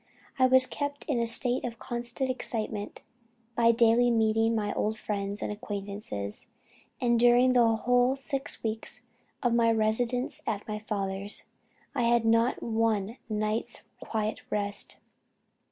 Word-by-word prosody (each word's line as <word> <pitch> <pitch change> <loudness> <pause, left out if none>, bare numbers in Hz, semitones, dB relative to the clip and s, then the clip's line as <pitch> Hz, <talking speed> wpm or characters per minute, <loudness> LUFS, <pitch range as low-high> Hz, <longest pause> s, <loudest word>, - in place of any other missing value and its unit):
I 260 - +6
was 260 0 +6
kept 285 +1 -4
in 270 -5 +1
a 235 - +1
state 245 +2 0
of 235 -2 -4
constant 240 +3 -2
excitement 215 -4 -2 0.5
by 230 -1 +5
daily 235 +1 +4
meeting 225 0 +2
my 205 -2 -1
old 215 +1 -1
friends 200 -1 -3
and - - -2
acquaintances; 200 - -5 0.5
and 240 -2 +2
during 245 +1 +5
the 240 -2 +5
whole 245 +3 +2
six 275 0 -2
weeks 220 0 -2 0.4
of 245 -2 +2
my 230 -1 +4
residence 230 +3 0
at 210 -2 -2
my 215 -1 -3
father's, 200 -1 -3 0.5
I 245 -4 +1
had 235 -1 +3
not 230 +2 +2
one 225 -1 0
night's 215 +1 -2 0.2
quiet 215 -1 -3
rest. 205 -1 -2
230 Hz, 135 wpm, -28 LUFS, 215-245 Hz, 0.5 s, I